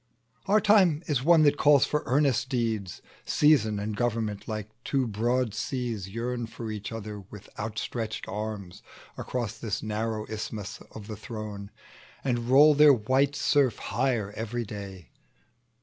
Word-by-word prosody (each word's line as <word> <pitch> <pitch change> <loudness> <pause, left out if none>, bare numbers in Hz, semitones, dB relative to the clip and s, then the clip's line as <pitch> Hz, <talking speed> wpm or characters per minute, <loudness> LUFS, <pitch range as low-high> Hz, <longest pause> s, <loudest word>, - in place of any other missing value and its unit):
Our 210 +2 +5
time 195 -7 +4
is 145 -7 0
one 165 0 +6
that 145 0 +3
calls 145 -2 +6
for 150 - -1
earnest 135 -1 +2
deeds: 115 -7 -2 0.4
Reason 125 -9 +4
and 105 +1 -3
Government, 110 -2 -2
like 110 -1 -5
two 135 -2 0
broad 120 +2 0
seas, 115 -4 -3
Yearn 120 +2 -3
for 115 -1 -7
each 105 +1 -6
other 105 -2 -6
with 105 -2 -11
outstretched 110 0 -4
arms 105 -2 -5 0.3
Across 115 -3 -4
this 110 -4 -3
narrow 110 0 -2
isthmus 110 -2 -6
of 105 - -8
the 110 0 -6
throne, 105 -2 -7 0.5
And 120 -2 -1
roll 145 +4 +7
their 150 0 +7
white 130 +5 +1
surf 140 -6 +2
higher 115 -3 -1
every 115 +2 -3
day. 100 -4 -8
115 Hz, 145 wpm, -27 LUFS, 105-130 Hz, 0.5 s, roll